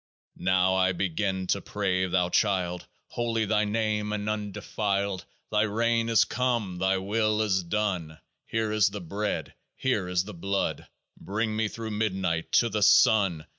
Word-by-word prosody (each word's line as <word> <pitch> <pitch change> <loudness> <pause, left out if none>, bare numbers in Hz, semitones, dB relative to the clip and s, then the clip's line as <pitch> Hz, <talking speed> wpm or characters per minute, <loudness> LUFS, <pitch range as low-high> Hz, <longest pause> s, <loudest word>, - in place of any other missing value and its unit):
Now 95 0 +2
I 95 0 +3
begin 95 +1 -1
to 100 - +1
pray: 95 -2 -1
Thou 90 -1 +1
Child, 90 -3 0 0.2
Holy 115 -2 -1
Thy 105 0 +2
name 105 -1 -1
and 105 0 -3
undefiled! 100 -2 -2 0.3
Thy 105 -1 +3
reign 115 +2 +1
is 115 - +5
come: 115 -7 -1
Thy 95 +1 +2
will 105 +2 0
is 95 -3 +1
done. 90 -4 -2 0.3
Here 110 -1 -1
is 105 -2 +3
the 105 +1 -6
Bread; 100 +4 -3 0.2
here 105 -8 0
is 90 0 +1
the 105 +2 -9
Blood. 100 +3 -2 0.3
Bring 110 +2 -2
me 110 0 +1
through 110 +1 -6
midnight 95 -6 -1
to 120 - +4
the 105 0 -2
Sun 95 -6 +4
100 Hz, 155 wpm, -27 LUFS, 95-110 Hz, 0.3 s, is